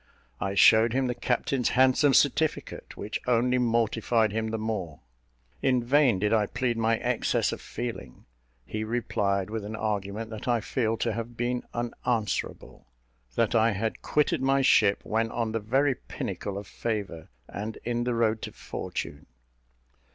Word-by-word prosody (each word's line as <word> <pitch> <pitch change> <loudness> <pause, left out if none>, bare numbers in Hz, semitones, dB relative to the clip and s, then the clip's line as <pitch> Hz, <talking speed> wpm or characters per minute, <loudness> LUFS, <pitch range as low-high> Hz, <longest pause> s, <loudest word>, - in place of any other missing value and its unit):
I 95 0 -2
showed 110 +3 +6
him 135 +1 +1
the 125 - 0
captain's 125 +1 0
handsome 130 +2 +5
certificate, 150 +2 +1
which 105 +2 -4
only 125 +1 +3
mortified 115 -2 +1
him 110 +1 -1
the 110 0 -2
more. 95 -9 -4 0.6
In 125 -3 +2
vain 135 -3 +4
did 105 +3 +1
I 105 -2 +3
plead 120 +1 -1
my 115 0 +1
excess - - 0
of - - -6
feeling. 115 - -6 0.4
He 110 - -4
replied 105 -3 -1
with 110 -1 -3
an 105 +2 -5
argument 105 +1 -3
that 110 +1 -7
I 120 -1 +3
feel 115 0 -1
to 115 -1 -1
have 115 +1 -6
been 120 +1 -1
unanswerable 120 -2 -3 0.5
that 115 -1 +1
I 115 -1 +4
had 110 +3 -3
quitted 150 -3 +1
my 135 +1 +2
ship 105 -6 +4
when 115 +1 0
on 115 -1 -2
the 115 - -1
very 135 +6 +2
pinnacle 100 -4 -5
of 100 - -6
favour, 100 -8 -4 0.2
and 105 +2 -6
in 120 0 -1
the 120 -1 -1
road 110 -1 +1
to - - -5
fortune. - - -6
115 Hz, 160 wpm, -27 LUFS, 110-120 Hz, 0.6 s, showed